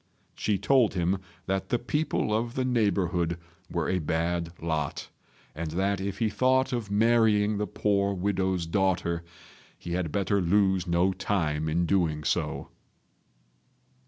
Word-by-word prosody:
She 105 Hz, -2 st, 0 dB
told 125 Hz, -1 st, +3 dB
him 90 Hz, +2 st, +1 dB, 0.3 s
that 95 Hz, 0 st, -2 dB
the 120 Hz, -, +2 dB
people 125 Hz, -2 st, -1 dB
of 115 Hz, +2 st, -2 dB
the 130 Hz, -, 0 dB
neighbourhood 90 Hz, -8 st, +1 dB, 0.3 s
were 85 Hz, -3 st, -1 dB
a 95 Hz, -, +1 dB
bad 85 Hz, +1 st, -1 dB
lot, 80 Hz, -3 st, -3 dB, 0.4 s
and 80 Hz, +1 st, -4 dB
that 95 Hz, +4 st, 0 dB
if 100 Hz, 0 st, -3 dB
he 115 Hz, -, +1 dB
thought 130 Hz, +4 st, +2 dB
of 115 Hz, -4 st, -2 dB
marrying 105 Hz, -1 st, +3 dB
the 105 Hz, -, -1 dB
poor 100 Hz, +1 st, +1 dB
widow's 95 Hz, -2 st, 0 dB
daughter, 85 Hz, -1 st, 0 dB, 0.5 s
he 85 Hz, -, -8 dB
had 85 Hz, -3 st, -1 dB
better 100 Hz, +2 st, +1 dB
lose 95 Hz, 0 st, +2 dB
no 85 Hz, +3 st, +2 dB
time 80 Hz, -7 st, -1 dB
in 85 Hz, +3 st, +1 dB
doing 80 Hz, -5 st, +1 dB
so. -, -, -1 dB
95 Hz, 140 wpm, -27 LUFS, 85-105 Hz, 0.5 s, told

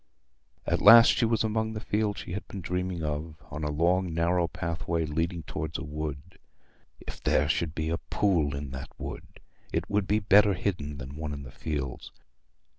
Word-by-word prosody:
At -, -, 0 dB
last 115 Hz, +3 st, +10 dB
she 120 Hz, -, +2 dB
was 115 Hz, -1 st, +1 dB
among 110 Hz, 0 st, -1 dB
the 110 Hz, -, -4 dB
fields 105 Hz, -1 st, -1 dB
she -, -, -9 dB
had 100 Hz, +3 st, -5 dB
been 100 Hz, -, -7 dB
dreaming 90 Hz, -1 st, -3 dB
of, 75 Hz, +1 st, -3 dB, 0.2 s
on 75 Hz, 0 st, -5 dB
a 75 Hz, -, -1 dB
long 85 Hz, +3 st, +1 dB
narrow 85 Hz, +1 st, +2 dB
pathway 85 Hz, 0 st, -2 dB
leading 80 Hz, +2 st, -2 dB
towards 80 Hz, +2 st, -4 dB
a -, -, -6 dB
wood. 75 Hz, +2 st, -6 dB, 0.6 s
If -, -, -9 dB
there -, -, +2 dB
should 80 Hz, -2 st, -1 dB
be 80 Hz, 0 st, -2 dB
a 85 Hz, -, -1 dB
pool 85 Hz, -9 st, +1 dB
in 70 Hz, -1 st, -6 dB
that 65 Hz, +1 st, -6 dB
wood! -, -, -8 dB, 0.3 s
It -, -, -2 dB
would 100 Hz, -2 st, +1 dB
be 105 Hz, -, +3 dB
better 100 Hz, -1 st, +5 dB
hidden 75 Hz, -7 st, -3 dB
than 70 Hz, +1 st, -8 dB
one 75 Hz, -2 st, -4 dB
in 70 Hz, -1 st, -6 dB
the 65 Hz, -, -10 dB
fields. 70 Hz, -2 st, -4 dB
85 Hz, 190 wpm, -28 LUFS, 75-95 Hz, 0.6 s, last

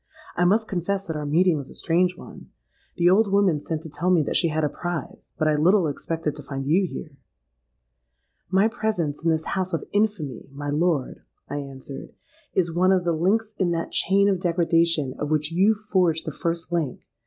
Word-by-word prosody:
'I 175 Hz, -, +2 dB
must 215 Hz, +5 st, +3 dB
confess 195 Hz, +2 st, -2 dB
that 160 Hz, -, -4 dB
our 150 Hz, -1 st, -3 dB
meeting 165 Hz, +1 st, +3 dB
is 135 Hz, -, -8 dB
a -, -, -11 dB
strange 180 Hz, +1 st, +1 dB
one. -, -, -12 dB, 0.5 s
The 175 Hz, -1 st, +3 dB
old 200 Hz, +3 st, +4 dB
woman 195 Hz, -6 st, +3 dB
sent 160 Hz, +1 st, -4 dB
to 160 Hz, -, -8 dB
tell 165 Hz, +5 st, -2 dB
me 175 Hz, -4 st, +4 dB
that -, -, -3 dB
she 170 Hz, -, +3 dB
had 155 Hz, 0 st, -1 dB
a -, -, +3 dB
prize; 175 Hz, +2 st, -6 dB
but 155 Hz, -, +1 dB
I 155 Hz, -, +3 dB
little 175 Hz, +5 st, +4 dB
expected 155 Hz, +1 st, -3 dB
to 150 Hz, -, -8 dB
find 135 Hz, -1 st, -5 dB
you 180 Hz, +6 st, +3 dB
here.'—'My -, -, -6 dB
presence 215 Hz, -11 st, -2 dB
in 165 Hz, -, +2 dB
this 160 Hz, -1 st, +1 dB
house 185 Hz, -1 st, -2 dB
of 165 Hz, -, -2 dB
infamy, 200 Hz, -, -1 dB
my 145 Hz, +1 st, -5 dB
lord,' 155 Hz, -3 st, 0 dB, 0.3 s
I 145 Hz, -, -4 dB
answered, 135 Hz, -1 st, -8 dB, 0.4 s
'is 175 Hz, -3 st, +1 dB
one 185 Hz, +2 st, +3 dB
of 185 Hz, -2 st, +2 dB
the 170 Hz, -, +2 dB
links 210 Hz, +7 st, +1 dB
in 185 Hz, -3 st, +2 dB
that 165 Hz, 0 st, -3 dB
chain 200 Hz, +2 st, +3 dB
of 195 Hz, -3 st, +2 dB
degradation 165 Hz, -5 st, +1 dB
of 150 Hz, -, -2 dB
which 155 Hz, 0 st, 0 dB
you 195 Hz, +6 st, +4 dB
forged 185 Hz, -6 st, 0 dB
the 155 Hz, -, -3 dB
first 170 Hz, +3 st, -3 dB
link. 160 Hz, -7 st, -1 dB
165 Hz, 200 wpm, -24 LUFS, 150-185 Hz, 0.5 s, old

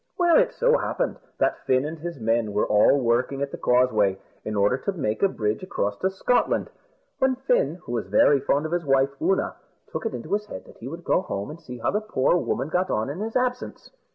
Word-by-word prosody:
Well, 345 Hz, -2 st, +5 dB
it -, -, +2 dB
so -, -, +2 dB
happened -, -, -2 dB, 0.2 s
that -, -, +1 dB
Fin 130 Hz, +1 st, +3 dB
and 160 Hz, +1 st, -5 dB
his 170 Hz, -2 st, -6 dB
men 115 Hz, -1 st, 0 dB
were 105 Hz, -, +2 dB
all 105 Hz, +7 st, +4 dB
working 125 Hz, +3 st, 0 dB
at 140 Hz, -, -4 dB
the -, -, -6 dB
Causeway, 110 Hz, -6 st, +2 dB, 0.3 s
in 105 Hz, -, -4 dB
order 100 Hz, +4 st, +3 dB
to 200 Hz, -, -2 dB
make 130 Hz, -, -2 dB
a 195 Hz, -, +5 dB
bridge 105 Hz, -, -2 dB
across 105 Hz, -, -2 dB
to 190 Hz, -, +1 dB
Scotland; 215 Hz, +6 st, 0 dB, 0.5 s
when 265 Hz, 0 st, +2 dB
Fin, 245 Hz, -, +1 dB
who -, -, -8 dB
was 115 Hz, -5 st, -2 dB
very 135 Hz, +8 st, +4 dB
fond 145 Hz, +3 st, 0 dB
of 160 Hz, -, -4 dB
his 175 Hz, 0 st, 0 dB
wife 135 Hz, -1 st, +2 dB
Oonagh, 190 Hz, -, +1 dB, 0.4 s
took -, -, -3 dB
it -, -, -5 dB
into 140 Hz, +10 st, -5 dB
his 210 Hz, +1 st, -1 dB
head 95 Hz, -, -8 dB
that -, -, -16 dB
he 120 Hz, -, -8 dB
would 165 Hz, +5 st, -7 dB
go -, -, +2 dB
home 100 Hz, -, -5 dB
and 165 Hz, +2 st, -11 dB
see 125 Hz, -6 st, -8 dB
how 115 Hz, -, -1 dB
the 210 Hz, -, 0 dB
poor 175 Hz, -8 st, +1 dB
woman 140 Hz, -4 st, -2 dB
got 180 Hz, +3 st, 0 dB
on 110 Hz, +5 st, -1 dB
in 155 Hz, -, -7 dB
his 220 Hz, +2 st, -4 dB
absence. 250 Hz, 0 st, -2 dB
140 Hz, 235 wpm, -25 LUFS, 115-190 Hz, 0.5 s, Well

